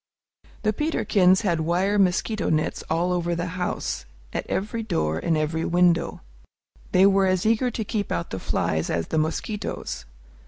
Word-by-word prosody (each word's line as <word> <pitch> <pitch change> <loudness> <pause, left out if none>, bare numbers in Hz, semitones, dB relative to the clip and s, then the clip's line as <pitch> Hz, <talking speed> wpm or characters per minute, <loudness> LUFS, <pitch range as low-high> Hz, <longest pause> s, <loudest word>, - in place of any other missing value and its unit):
The 215 0 +2
Peterkins 195 - +3
had 175 -6 +1
wire 180 +6 +1
mosquito 200 +3 +1
nets 155 0 0
all 175 +3 +1
over 175 -1 0
the 170 +1 -2
house, 175 - -3 0.3
at - - -3
every 215 +4 -2
door 120 - -1
and 160 - +1
every 155 +1 -1
window. 170 -1 +2 0.7
They 185 +1 +6
were 195 -1 +4
as 185 0 +1
eager 225 +3 +3
to 230 -1 -3
keep 205 -1 -2
out 170 - -2
the 95 - -3
flies 80 -3 -1
as 85 -1 -1
the 160 - +1
mosquitoes. 160 - -3
180 Hz, 160 wpm, -24 LUFS, 160-200 Hz, 0.7 s, They